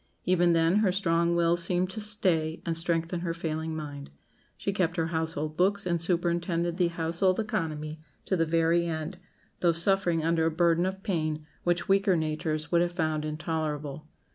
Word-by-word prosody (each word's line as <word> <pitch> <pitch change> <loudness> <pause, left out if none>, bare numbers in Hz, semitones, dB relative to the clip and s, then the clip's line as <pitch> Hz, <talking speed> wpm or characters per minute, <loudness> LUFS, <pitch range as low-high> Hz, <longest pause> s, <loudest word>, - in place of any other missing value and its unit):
Even 175 -1 +3
then 165 +3 +3
her 210 -3 +3
strong 170 -2 +1
will 170 0 +3
seemed 180 +2 0
to 215 - -4
stay 180 -7 +1
and 165 - -1
strengthen 165 +1 0
her 170 -1 -3
failing 160 -1 -3
mind. 145 -2 -7 0.5
She 200 - -2
kept 180 -2 0
her 165 - +1
household 160 -1 -2
books 200 +3 +1
and 170 -2 0
superintended 170 0 0
the 180 - +3
household 170 +3 0
economy 155 -7 -3 0.2
to 190 - +1
the 165 -2 +1
very 165 +1 +2
end, 160 +2 -4 0.4
though 170 -1 +3
suffering 175 -1 +2
under 165 -1 +2
a - - +3
burden 170 +2 +2
of 190 +1 -5
pain 155 -6 -2 0.2
which 175 +1 0
weaker 195 -2 +3
natures 155 0 -2
would 170 -1 +4
have 175 0 0
found 155 -3 -1
intolerable. 155 -1 -3
170 Hz, 170 wpm, -28 LUFS, 160-180 Hz, 0.5 s, would